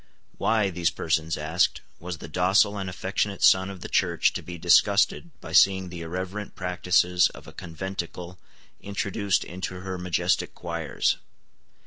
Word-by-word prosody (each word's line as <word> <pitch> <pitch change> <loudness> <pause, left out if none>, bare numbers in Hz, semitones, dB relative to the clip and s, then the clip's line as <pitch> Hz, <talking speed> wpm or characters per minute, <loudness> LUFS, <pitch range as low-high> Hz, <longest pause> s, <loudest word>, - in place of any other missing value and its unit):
Why, 110 -3 +2
these 85 -1 +1
persons 80 -1 -1
asked, 80 +4 +1 0.2
was 90 0 -6
the - - -9
docile 95 +5 +3
and 95 -2 -4
affectionate 95 +2 -2
son 95 0 +5
of 95 -2 -9
the - - -6
Church 85 -3 +2
to - - -4
be 90 -1 -8
disgusted 100 - +3
by - - -9
seeing 95 -1 +4
the 85 -1 -8
irreverent 95 +5 -5
practices 90 -1 +2
of - - -13
a - - -12
conventicle 90 +1 -6 0.4
introduced 100 -1 -1
into 90 0 -6
her 95 -1 -5
majestic 90 -2 0
choirs? - - -1
90 Hz, 145 wpm, -26 LUFS, 85-95 Hz, 0.4 s, son